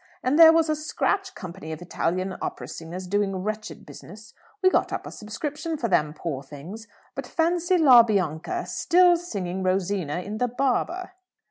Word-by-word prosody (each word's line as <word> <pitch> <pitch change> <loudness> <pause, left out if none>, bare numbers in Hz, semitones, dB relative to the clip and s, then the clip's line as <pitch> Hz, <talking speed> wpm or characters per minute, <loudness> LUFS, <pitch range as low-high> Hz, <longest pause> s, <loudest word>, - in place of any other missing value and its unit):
And 275 +5 +2
there 325 -1 +10
was 325 0 +3
a 310 - +1
scratch 385 +5 -2
company 170 -3 -8
of 155 - -6
Italian 180 +2 -2
opera - - -5
singers 170 +3 -7
doing 200 +1 0
wretched 215 0 -5
business. 220 +2 -13 0.3
We 370 - +6
got - - +1
up - - -4
a - - -7
subscription 295 +9 -5
for 235 -5 -2
them, 150 -4 +1
poor 150 -5 -4
things. 160 +11 -10 0.3
But - - -6
fancy 345 +2 +1
'La 265 -7 +8
Bianca' 200 - -1
still 355 0 +4
singing 195 - -4
Rosina 185 -4 -1
in 210 +4 -6
the 250 - +2
'Barber!'" 275 +9 -1
215 Hz, 165 wpm, -25 LUFS, -, 0.3 s, there